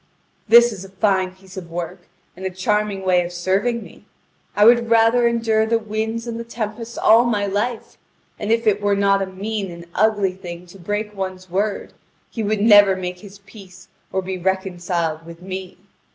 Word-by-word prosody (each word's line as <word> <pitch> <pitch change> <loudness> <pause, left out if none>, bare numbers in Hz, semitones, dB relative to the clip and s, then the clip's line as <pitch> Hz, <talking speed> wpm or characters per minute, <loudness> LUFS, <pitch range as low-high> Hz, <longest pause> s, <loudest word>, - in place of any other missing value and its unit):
This 235 0 +7
is 190 -2 -8
a 195 - -11
fine 190 -1 0
piece 190 0 -15
of 175 -3 -7
work, 175 +1 -6 0.3
and 185 - -11
a 190 - -1
charming 200 +1 -1
way 180 -1 +3
of 175 - -6
serving 195 +7 0
me! - - -16 0.5
I 205 - +5
would 235 0 +5
rather 230 +1 +4
endure 225 -2 +1
the 230 +1 +2
winds 220 +1 -3
and 230 -1 -5
the - - -4
tempests 230 0 -6
all 225 +2 +6
my 215 -4 0
life: 210 +4 -3 0.4
And 210 +1 -2
if 230 0 +2
it 210 -1 +2
were 205 0 +2
not 200 0 +2
a 195 - -1
mean 200 +1 -4
and 170 0 -10
ugly 205 -2 +2
thing 175 -1 -9
to 195 - -14
break 210 +4 -3
one's 185 -1 -6
word, 200 +3 -2 0.4
he 230 - -4
would 215 -1 0
never 205 -3 +7
make 180 -1 -5
his 200 0 -13
peace 190 -3 -14 0.2
or 190 0 -1
be 185 0 -4
reconciled 175 -3 -2
with 170 +1 -12
me. 185 -1 -7
200 Hz, 190 wpm, -21 LUFS, 185-220 Hz, 0.5 s, This